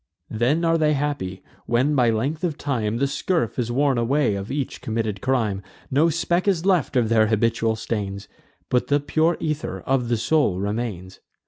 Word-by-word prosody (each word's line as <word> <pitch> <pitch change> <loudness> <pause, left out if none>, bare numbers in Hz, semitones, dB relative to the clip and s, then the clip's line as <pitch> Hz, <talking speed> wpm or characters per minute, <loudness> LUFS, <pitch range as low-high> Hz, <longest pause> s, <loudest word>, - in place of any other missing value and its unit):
Then 130 +10 +1
are 165 0 +3
they 150 -1 +3
happy, 140 -11 -3 0.2
when 125 +6 +2
by 125 -4 +3
length 135 +9 -1
of 165 -5 -1
time 115 -6 -1
The 140 - +1
scurf 140 - -1
is 120 -1 -1
worn 135 0 +2
away 125 0 +2
of 100 +1 -4
each 140 -1 -3
committed 110 -5 -2
crime; 115 -7 0 0.3
No 150 +5 +4
speck 170 +3 0
is 185 -3 +1
left 180 -10 +2
of 120 -3 +3
their 110 -1 +4
habitual 115 +1 +1
stains, 105 -3 -4 0.4
But 125 - +1
the 145 0 +3
pure 155 +3 +1
ether 155 -1 -3
of 130 -3 0
the 120 - +2
soul 115 - +1
remains. 100 -3 -4
125 Hz, 180 wpm, -23 LUFS, 110-150 Hz, 0.4 s, No